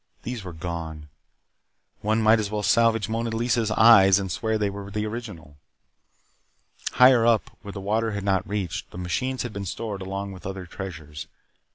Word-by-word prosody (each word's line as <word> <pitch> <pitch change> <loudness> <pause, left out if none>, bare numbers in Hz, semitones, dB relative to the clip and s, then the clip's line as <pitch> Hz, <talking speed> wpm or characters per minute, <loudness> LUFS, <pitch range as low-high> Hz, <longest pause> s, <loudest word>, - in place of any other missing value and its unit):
These 120 -3 -5
were 90 - -7
gone. 80 -3 -6 0.9
One 110 +2 +1
might 110 +1 +5
as 105 -2 -2
well 105 0 -3
salvage 115 -2 +3
Mona 115 +1 -2
Lisa's 115 0 0
eyes 105 -3 +7
and 95 -2 -3
swear 110 +5 -1
that 110 - +1
they - - +1
were 100 0 -7
the 105 +1 -2
original. 105 - -7 1.4
Higher 125 -2 +6
up, 115 -3 +2
where 100 - -8
the 100 - -6
water 110 +3 0
had 100 -1 -4
not 95 -1 0
reached, 100 -5 -3
the - - -11
machines 130 +9 -2
had 120 -3 -6
been 100 - -5
stored 100 +1 -5
along 100 +1 -4
with 95 -1 -9
other 95 -1 -6
treasures. 80 -5 -8
100 Hz, 180 wpm, -25 LUFS, 95-115 Hz, 1.4 s, eyes